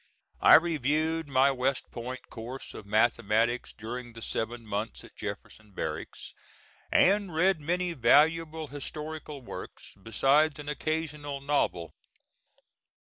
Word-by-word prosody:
I -, -, +9 dB
reviewed 160 Hz, 0 st, +2 dB
my 135 Hz, 0 st, +4 dB
West 130 Hz, 0 st, -1 dB
Point 125 Hz, +1 st, -6 dB
course 120 Hz, +4 st, -7 dB
of 100 Hz, -, -10 dB
mathematics 115 Hz, +2 st, +2 dB
during 120 Hz, +2 st, -7 dB
the 115 Hz, -, -10 dB
seven 115 Hz, +1 st, -3 dB
months 105 Hz, +1 st, -4 dB
at -, -, -15 dB
Jefferson 105 Hz, -2 st, -8 dB
Barracks, 80 Hz, -3 st, -5 dB, 0.6 s
and 195 Hz, -2 st, +3 dB
read 180 Hz, 0 st, +3 dB
many 175 Hz, +3 st, -1 dB
valuable 160 Hz, +4 st, +3 dB
historical 150 Hz, 0 st, -7 dB
works, -, -, -9 dB
besides 140 Hz, +8 st, +3 dB
an 145 Hz, 0 st, -7 dB
occasional 150 Hz, -2 st, -3 dB
novel. 115 Hz, -, 0 dB
140 Hz, 115 wpm, -29 LUFS, 115-155 Hz, 0.6 s, I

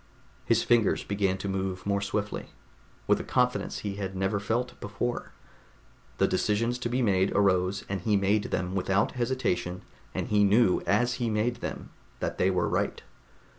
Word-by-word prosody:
His 115 Hz, 0 st, +3 dB
fingers 120 Hz, -3 st, +3 dB
began 100 Hz, -2 st, 0 dB
to 100 Hz, -, -5 dB
move 95 Hz, -1 st, -3 dB
more 100 Hz, 0 st, +1 dB
swiftly, 100 Hz, +1 st, -3 dB, 0.6 s
with -, -, +3 dB
a -, -, -4 dB
confidence 125 Hz, 0 st, 0 dB
he 100 Hz, -1 st, -4 dB
had 95 Hz, -1 st, -4 dB
never 95 Hz, +2 st, 0 dB
felt 120 Hz, +4 st, -2 dB
before. 120 Hz, +4 st, -3 dB, 0.9 s
The -, -, +3 dB
decisions 115 Hz, +4 st, 0 dB
to 120 Hz, -, -2 dB
be 125 Hz, +1 st, +1 dB
made 95 Hz, -3 st, +2 dB
arose, 95 Hz, -1 st, +2 dB
and 100 Hz, -2 st, -3 dB
he 105 Hz, +1 st, +2 dB
made 100 Hz, +2 st, +2 dB
them 90 Hz, +1 st, -2 dB
without 95 Hz, +1 st, +1 dB
hesitation, 105 Hz, -8 st, -1 dB, 0.3 s
and -, -, -3 dB
knew 105 Hz, 0 st, +4 dB
as 120 Hz, +6 st, +3 dB
he 120 Hz, -, +1 dB
made 110 Hz, +3 st, 0 dB
them -, -, -6 dB, 0.3 s
that -, -, -3 dB
they 95 Hz, -, +4 dB
were 90 Hz, -2 st, +1 dB
right. -, -, -1 dB
100 Hz, 165 wpm, -28 LUFS, 95-115 Hz, 0.9 s, knew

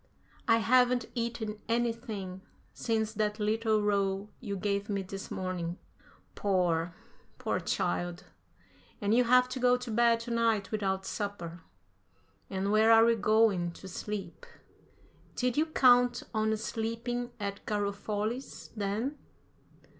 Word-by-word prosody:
"I 225 Hz, -, +6 dB
haven't 250 Hz, +2 st, +3 dB
eaten 230 Hz, -3 st, -3 dB
anything 225 Hz, -5 st, -2 dB, 0.3 s
since 220 Hz, -2 st, -1 dB
that 210 Hz, 0 st, -1 dB
little 215 Hz, 0 st, +1 dB
roll 200 Hz, 0 st, 0 dB
you 200 Hz, -1 st, -4 dB
gave 200 Hz, +1 st, -1 dB
me 200 Hz, -1 st, -1 dB
this 195 Hz, +1 st, -7 dB
morning." 180 Hz, -2 st, -3 dB, 0.6 s
"Poor, 175 Hz, -4 st, +1 dB, 0.4 s
poor -, -, -1 dB
child, 175 Hz, -, -2 dB, 0.8 s
and 205 Hz, +1 st, +1 dB
you'll 245 Hz, +1 st, +4 dB
have 250 Hz, +1 st, +6 dB
to 255 Hz, -, -4 dB
go 250 Hz, 0 st, +4 dB
to 250 Hz, -1 st, -6 dB
bed 235 Hz, +1 st, +4 dB
to 235 Hz, +1 st, -6 dB
night 225 Hz, -4 st, +1 dB
without 190 Hz, -3 st, -1 dB
supper. 180 Hz, -5 st, -4 dB, 0.9 s
And 195 Hz, +1 st, -1 dB
where 220 Hz, +1 st, +5 dB
are 225 Hz, 0 st, +8 dB
we 235 Hz, -, +5 dB
going 215 Hz, -5 st, +2 dB
to 190 Hz, -, -11 dB
sleep?" 210 Hz, -, -6 dB, 0.9 s
"Did 250 Hz, -1 st, 0 dB
you 310 Hz, +2 st, +2 dB
count 245 Hz, -4 st, +4 dB
on 220 Hz, 0 st, +1 dB
sleeping 230 Hz, +2 st, -3 dB
at 200 Hz, -1 st, -4 dB
Garofoli's, 210 Hz, +4 st, -3 dB
then?" 220 Hz, +8 st, -2 dB
215 Hz, 125 wpm, -30 LUFS, 200-235 Hz, 0.9 s, are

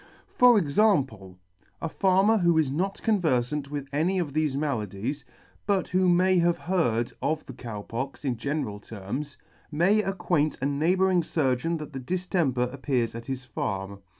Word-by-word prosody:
For 245 Hz, -2 st, +5 dB
example. 140 Hz, -, +1 dB, 0.4 s
~A -, -, -3 dB
farmer 195 Hz, +5 st, +3 dB
who 170 Hz, -2 st, +3 dB
is 150 Hz, -4 st, +2 dB
not 190 Hz, +7 st, -2 dB
converfant 150 Hz, -, +1 dB
with 145 Hz, -1 st, -5 dB
any 170 Hz, +6 st, +1 dB
of 165 Hz, -6 st, -2 dB
thefe 155 Hz, -3 st, 0 dB
maladies, 125 Hz, -2 st, -3 dB, 0.4 s
but 195 Hz, -3 st, +1 dB
who 185 Hz, 0 st, +3 dB
may 180 Hz, +1 st, +4 dB
have 170 Hz, 0 st, +2 dB
heard 120 Hz, -11 st, 0 dB
of 155 Hz, +1 st, -1 dB
the -, -, -9 dB
Cow 110 Hz, -4 st, -7 dB
Pox 135 Hz, +7 st, -5 dB
in 130 Hz, -3 st, 0 dB
general 130 Hz, -4 st, -3 dB
terms, 115 Hz, +8 st, -6 dB, 0.3 s
may 185 Hz, +8 st, +3 dB
acquaint 175 Hz, -6 st, 0 dB
a 135 Hz, -, -2 dB
neighbouring 180 Hz, +6 st, +2 dB
furgeon 155 Hz, +1 st, 0 dB
that 150 Hz, -1 st, -8 dB
the 135 Hz, -, -4 dB
diftemper 135 Hz, -5 st, -1 dB
appears 130 Hz, -4 st, -1 dB
at 115 Hz, 0 st, -8 dB
his 130 Hz, -1 st, -4 dB
farm. 100 Hz, -4 st, -4 dB
150 Hz, 155 wpm, -26 LUFS, 125-180 Hz, 0.4 s, For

